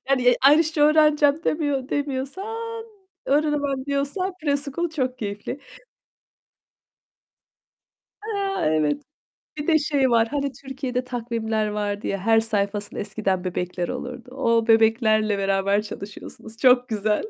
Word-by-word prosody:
Yani 250 -2 +4 0.2
Irish'ce 315 0 +2
öğreneceğim 300 0 +4
demiyor 285 -4 -1
demiyorsan 390 +12 -4 0.4
öğrenemem 285 -2 0
diyorsan 285 +7 -1
preschool 285 +3 -1
çok 260 -5 -2
keyifli. 205 +5 -5 2.7
Eee, 400 -3 -2
evet. 150 - 0 0.6
Bir 295 - -4
de 320 -2 +4
şey 285 -3 +1
var, 225 -1 +3
hani, 280 -1 -2
Türkiye'de 265 -1 -4
takvimler 230 -3 -2
vardı 205 0 -3
ya, 195 - -1
her 225 +3 +3
sayfasında 205 -2 -2
eskiden 195 -3 -2
bebekler 180 -1 -3
olurdu. 250 0 -6
O 230 -4 +1
bebeklerle 220 -2 +3
beraber 195 +1 +1
çalışıyorsunuz. 215 +1 -10
Çok 250 -1 +4
güzel. 210 -1 0
250 Hz, 110 wpm, -23 LUFS, 215-290 Hz, 2.7 s, Yani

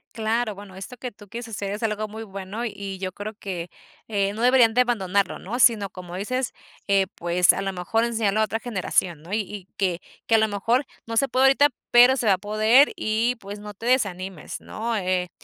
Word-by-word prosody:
Claro, 225 -1 0
bueno, 200 -1 -11
esto 195 +6 -9
que 250 0 -6
tú 205 0 -16
quieres 235 +3 -6
hacer 200 -2 -4
es 210 +3 -5
algo 215 -1 -1
muy 220 +2 -8
bueno 195 +3 -6
y 200 -3 -5
yo 185 0 -4
creo 210 +3 -7
que, 180 -4 -5 0.4
eh, 200 -2 0
no 220 - -5
deberían 245 -2 +5
de 250 - +5
abandonarlo, 200 -6 0
¿no? 230 +7 -5
Si 240 -2 +7
no 200 -2 -6
como 180 -1 -9
dices, 255 +7 -2 0.4
eh, 195 -1 +3
pues, 175 +1 +3
a - - -3
lo 195 - -2
mejor 185 +6 0
enseñarlo 220 -3 +1
a - - +5
otra 225 +1 -3
generación, 185 -7 -1
¿no? 170 +4 -13
Y 215 - +2
y 200 -2 -8
que 180 -3 0 0.3
que 225 - +4
a - - +7
lo 220 - +3
mejor 230 +6 +1 0.2
no 230 - -5
se 275 +4 +3
puede 260 +2 +3
ahorita, 275 +2 +5 0.2
pero 245 +2 +7
se 245 - -2
va 205 - +5
a 185 - +1
poder 215 +7 +4
y 225 +3 0
pues 200 0 -8
no 210 0 -8
te 225 - -9
desanimes, 190 - -1
¿no? 225 +1 -3
Eh, 185 -2 -1
210 Hz, 225 wpm, -24 LUFS, 195-235 Hz, 0.4 s, Si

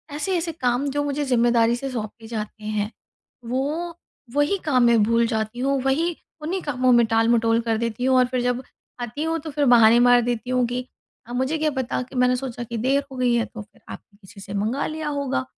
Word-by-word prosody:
ऐसे-ऐसे 340 +1 -1
काम 255 -2 -1
जो 290 +1 -1
मुझे 290 0 -2
ज़िम्मेदारी 235 -2 +3
से 270 +2 -5
सौंपे 225 -1 -6
जाते 215 -1 -6
हैं, 215 0 -2 0.5
वो 300 +8 -2 0.4
वही 290 +7 +2
काम 255 -5 +3
मैं 235 -2 +5
भूल 230 +2 +3
जाती 220 +1 -3
हूँ, 270 0 +1
वही 320 +6 +1 0.3
उन्हीं 360 +5 -2
कामों 255 -3 +1
में 240 -1 +5
टाल-मटोल 225 0 +2
कर 225 -1 0
देती 235 +2 -2
हूँ। 260 -1 +4
और 255 - +5
फिर 250 -1 -1
जब 245 +1 -1 0.4
आती 240 +6 -4
हूँ, 325 0 -1
तो 310 - -7
फिर 290 0 0
बहाने 235 -1 +6
मार 245 0 +6
देती 240 +1 -3
हूँ 250 -1 +2
कि, 250 +1 -3 0.4
"अब 240 - -6
मुझे 260 +5 0
क्या 310 0 +1
पता, 260 -2 -2
कि 260 +2 -10
मैंने 250 0 +3
सोचा 245 -2 -5
कि 235 0 -5
देर 270 +5 +1
हो 260 - -8
गई 250 -1 +2
है, 230 - +1
तो 225 - -9
फिर 205 - -18
आपने 200 - -11
किसी 195 +2 -14
से 195 - -8
मँगा 215 +7 -1
लिया 310 -1 -4
होगा।" 280 -2 -2
250 Hz, 215 wpm, -23 LUFS, 230-280 Hz, 0.5 s, बहाने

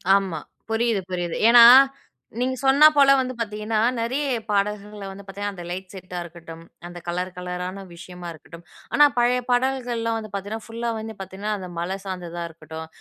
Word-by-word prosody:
ஆமா. 190 -5 -1 0.3
புரியுது, 225 -2 +1
புரியுது. 175 -2 -2
ஏன்னா, 235 -1 +9 0.7
நீங்க 260 +1 0
சொன்னா 275 +3 +7
போல 275 -1 +6
வந்து 255 -1 -2
பார்த்தீங்கன்னா, 215 0 -2 0.2
நிறைய 255 +6 -1 0.3
பாடல்கள் 205 0 -2
வந்து 200 +1 -11
பார்த்தீங்கன்னா, 200 +1 -5
அந்த 175 - -8
லைட் 185 +2 -6
செட்டா 185 -1 -8
இருக்கட்டும், 165 -1 -11 0.2
அந்த 175 0 -9
கலர் 180 +1 -2
கலரான 180 +2 -5
விஷயமா 180 0 -10
இருக்கட்டும். 165 +2 -14 0.3
ஆனா, 295 - +7
பழைய 245 +1 +3
பாடல்கள்லாம் 245 -3 0
வந்து 215 -2 -9
பார்த்தேன்னா, 205 +3 -4
ஃபுல்லா 230 +1 -4
வந்து 220 0 -6
பார்த்தேன்னா, 195 +3 -5
அந்த 185 -2 -8
மலை 185 +3 -2
சார்ந்ததா 175 -2 -5
இருக்கட்டும், 160 0 -9
200 Hz, 155 wpm, -23 LUFS, 180-230 Hz, 0.7 s, ஏன்னா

